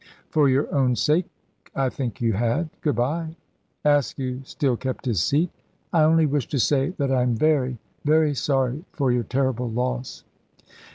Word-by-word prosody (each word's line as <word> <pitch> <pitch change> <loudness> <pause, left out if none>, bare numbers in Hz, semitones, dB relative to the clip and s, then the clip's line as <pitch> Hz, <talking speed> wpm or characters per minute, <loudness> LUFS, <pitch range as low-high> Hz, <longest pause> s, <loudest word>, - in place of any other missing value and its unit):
"For 150 -3 +4
your 135 +2 +2
own 130 -3 +2
sake, 150 - +2 0.5
I 135 -1 +1
think 125 -2 -5
you 115 -1 +2
had. 120 - 0
Good 150 - 0
bye." 160 +7 -1 0.5
Askew 135 -3 +1
still 135 -2 0
kept 130 +3 -5
his 110 -9 +1
seat. 155 - +1 0.4
"I 165 - +4
only 160 +1 +5
wish 145 -3 0
to 140 - -2
say 135 +3 +2
that 140 -2 0
I 130 -1 +3
am 125 -1 +1
very 130 -2 +1 0.3
very 155 0 +3
sorry 135 +2 0
for 135 -4 +1
your 120 0 +2
terrible 125 0 -1
loss." 125 +2 -3
135 Hz, 165 wpm, -24 LUFS, 125-150 Hz, 0.5 s, only